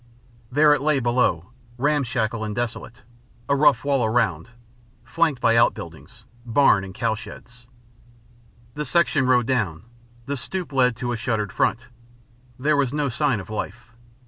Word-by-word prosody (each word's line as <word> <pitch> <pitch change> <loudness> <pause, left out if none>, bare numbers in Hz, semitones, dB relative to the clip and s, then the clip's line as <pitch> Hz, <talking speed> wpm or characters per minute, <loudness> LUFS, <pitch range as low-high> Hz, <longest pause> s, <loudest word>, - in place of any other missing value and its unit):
There 150 +3 +5
it 145 - 0
lay 150 -1 +2
below, 120 -7 0 0.3
ramshackle 125 -5 0
and 105 -1 -4
desolate, 120 0 -5 0.4
a 140 - +2
rough 140 -3 +3
wall 140 -3 +1
around; 115 +2 0 0.5
flanked 165 -6 0
by 115 -1 +3
outbuildings 115 - -1 0.2
barn 120 -4 +3
and 95 - -8
cowsheds. 115 +2 -5 1.1
The 150 - -4
section 150 -5 +1
rode 125 -2 +3
down. 105 -10 -1 0.4
The 140 +1 -3
stoep 150 +6 -5
led 125 -2 +3
to 120 +1 -4
a - - -1
shuttered 110 -3 -2
front. 115 +1 0 0.7
There 150 +4 +1
was 135 -3 +1
no 145 -1 -1
sign 135 -2 0
of 95 - -10
life. 115 +3 -6
125 Hz, 145 wpm, -23 LUFS, 115-140 Hz, 1.1 s, There